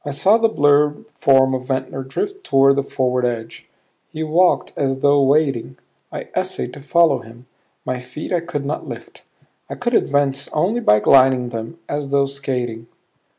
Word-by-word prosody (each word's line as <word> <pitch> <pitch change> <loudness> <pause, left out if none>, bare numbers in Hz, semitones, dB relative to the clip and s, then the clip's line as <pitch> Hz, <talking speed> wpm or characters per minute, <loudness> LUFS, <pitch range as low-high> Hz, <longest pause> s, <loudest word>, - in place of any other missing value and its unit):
I - - -5
saw 190 +10 +3
the 225 0 +3
blurred 145 -4 +2
form 135 -1 +4
of 130 -1 -3
Ventnor 130 0 -3
drift 390 - -5
toward 135 - +4
the - - +2
forward 125 -2 -1
edge. 115 -2 -4 0.4
He 160 - -5
walked 170 +4 +2
as 135 -1 -2
though 145 0 +4
wading. 135 -3 +1 0.3
I - - -7
essayed 65 - -3
to 145 - -11
follow 165 0 +3
him; 120 +1 -15 0.4
my 130 0 -3
feet 130 +8 -7
I 175 - +2
could 145 -4 -5
not 145 - -4
lift; - - -10 0.5
I - - -5
could 245 0 -3
advance 140 - +1
only 190 +10 0
by 105 - +3
gliding 130 -2 +4
them 115 +7 -7
as 145 -1 -4
though 140 0 +2
skating. 125 -4 -4
140 Hz, 170 wpm, -19 LUFS, 130-150 Hz, 0.5 s, form